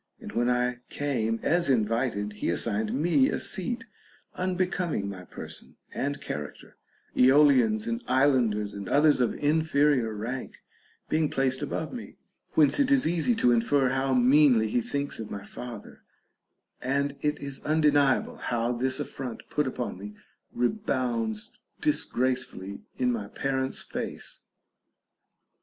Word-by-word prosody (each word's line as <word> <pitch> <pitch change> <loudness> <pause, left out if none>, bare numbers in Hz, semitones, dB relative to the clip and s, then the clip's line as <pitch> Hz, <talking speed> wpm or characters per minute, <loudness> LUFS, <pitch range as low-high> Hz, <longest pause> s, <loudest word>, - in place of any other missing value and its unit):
And - - -8
when 120 +1 +1
I 125 0 +1
came 115 -6 -1
as 170 0 +2
invited, 110 -3 0
he 105 - -3
assigned 105 +5 -1
me 175 - +3
a - - -1
seat 240 +6 -2 0.5
unbecoming 180 - -1
my 95 -2 -7
person - - -10 0.2
and 145 +1 -2
character, 75 0 -7 0.4
Aeolians 130 -5 +5
and 115 0 -3
islanders 125 -6 +2
and 100 -1 -6
others 145 -2 +4
of 120 - +1
inferior 145 -5 +2
rank 120 +5 -6 0.4
being 155 -1 +1
placed 130 -1 0
above - - -3
me; - - -8 0.4
whence 150 - +4
it 280 - +3
is 275 -2 +4
easy 175 +8 +2
to 125 - +3
infer 125 +3 +3
how 135 0 +1
meanly 125 -3 +5
he 120 - +1
thinks 140 +2 -2
of 110 - -6
my 100 - -6
father, 115 +1 -9 0.8
and 140 +2 0
it 150 0 0
is 140 -1 -6
undeniable 145 -3 +2
how 120 0 -1
this 130 +3 -1
affront 135 -4 -6
put 150 -2 +1
upon 125 -6 -4
me 105 +1 -8 0.4
rebounds 120 - -1 0.3
disgracefully 125 -6 -1 0.2
in 125 -1 +2
my 110 -4 -3
parent's 130 +3 -1
face. - - -5
130 Hz, 135 wpm, -27 LUFS, 115-145 Hz, 0.8 s, Aeolians